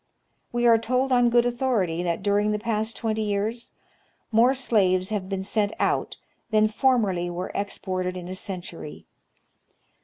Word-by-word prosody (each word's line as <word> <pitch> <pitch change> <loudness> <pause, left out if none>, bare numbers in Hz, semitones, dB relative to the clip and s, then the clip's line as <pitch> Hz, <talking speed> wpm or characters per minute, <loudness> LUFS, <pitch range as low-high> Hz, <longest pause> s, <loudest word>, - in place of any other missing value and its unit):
We 240 0 0
are 230 -1 +6
told 255 +3 0
on 245 -1 +4
good 240 0 +4
authority 235 -9 0
that 175 +1 -2
during 205 +1 +2
the 210 - 0
past 220 0 -2
twenty 220 -1 -1
years 215 +3 -2 0.6
more 235 +4 +4
slaves 190 -7 +2
have 200 -3 -3
been 195 -1 -2
sent 205 +1 0
out - - 0 0.3
than 215 -1 +3
formerly 215 -8 +1
wei 175 +1 -4
e - - -7
exported 185 -2 -3
in 175 -1 -7
a 185 - -5
century. 180 -5 -6
210 Hz, 155 wpm, -25 LUFS, 185-235 Hz, 0.6 s, are